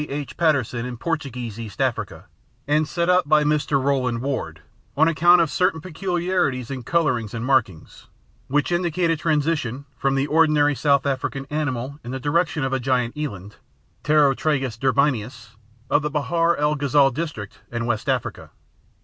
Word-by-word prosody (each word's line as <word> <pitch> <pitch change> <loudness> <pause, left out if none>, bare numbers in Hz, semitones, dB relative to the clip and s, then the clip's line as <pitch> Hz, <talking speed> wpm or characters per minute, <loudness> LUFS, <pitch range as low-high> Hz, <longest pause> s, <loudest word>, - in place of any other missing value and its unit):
H. 145 0 -5
Patterson 140 -8 +1
in 125 -1 -6
Portuguese 125 -8 -4
East 110 -3 -8
Africa, - - -2 0.4
and 150 +1 +2
set 170 +1 -1
up 180 -4 +3
by 155 -1 +5
Mr. 150 -1 +1
Rowland 130 -3 0
Ward, 120 - -3 0.4
on 160 +2 +5
account 175 +2 +5
of 160 -3 0
certain 180 -3 +1
peculiarities 175 - -2
in 130 -2 -4
colouring 125 -6 0
and 115 0 -4
markings, 115 -11 -1 0.4
which 145 +5 0
indicate 175 -1 +1
a - - +2
transition 150 -4 -1
from 135 +2 0
the 135 0 +1
ordinary 150 -1 +3
South 140 0 +2
African 135 0 -2
animal 140 -2 -3
in 120 - -8
the 130 +1 -4
direction 150 +1 0
of 135 - -1
the 135 - 0
giant 125 -2 0
eland 105 -10 -6 0.5
(Taurotragus 140 -4 +2
derbianus) 125 -4 0 0.4
of 145 - +2
the 150 - -2
Bahr 165 +3 +1
el 150 +1 +1
Ghazal 140 -1 +3
district 130 -9 -6
and 120 0 -3
West 115 -3 -2
Africa. - - -2
140 Hz, 160 wpm, -22 LUFS, 125-155 Hz, 0.5 s, by